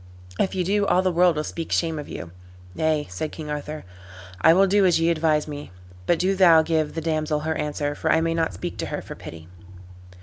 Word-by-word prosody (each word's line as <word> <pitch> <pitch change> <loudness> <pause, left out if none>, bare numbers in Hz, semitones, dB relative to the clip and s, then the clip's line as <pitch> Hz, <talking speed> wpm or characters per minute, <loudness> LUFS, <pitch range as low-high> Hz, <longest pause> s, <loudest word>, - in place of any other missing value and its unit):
If 190 - 0
ye 185 - 0
do 200 +2 +1
all 185 - +3
the 185 - +2
world 175 0 +3
will 150 - -1
speak 165 +1 -6
shame 165 -2 0
of 145 - -8
you." 85 - -7 0.4
"Nay," 155 +2 0
said 120 +12 -4
King 155 -2 -7
Arthur, 150 +1 -5 0.6
"I 160 - +7
will 190 +4 +5
do 200 +1 +3
as 175 -3 +4
ye 165 +1 +2
advise 155 -2 +1
me; 145 -1 -7 0.4
but 170 - +3
do 185 +3 +1
thou 170 -4 +6
give 155 -2 -1
the 165 - -2
damsel 155 -1 -1
her 160 +1 -1
answer, 145 -1 -2
for - - -1
I 160 - +4
may 165 0 0
not 165 - -1
speak - - -6
to - - -2
her - - -5
for - - -8
pity." 80 0 -11
160 Hz, 230 wpm, -24 LUFS, 150-175 Hz, 0.6 s, I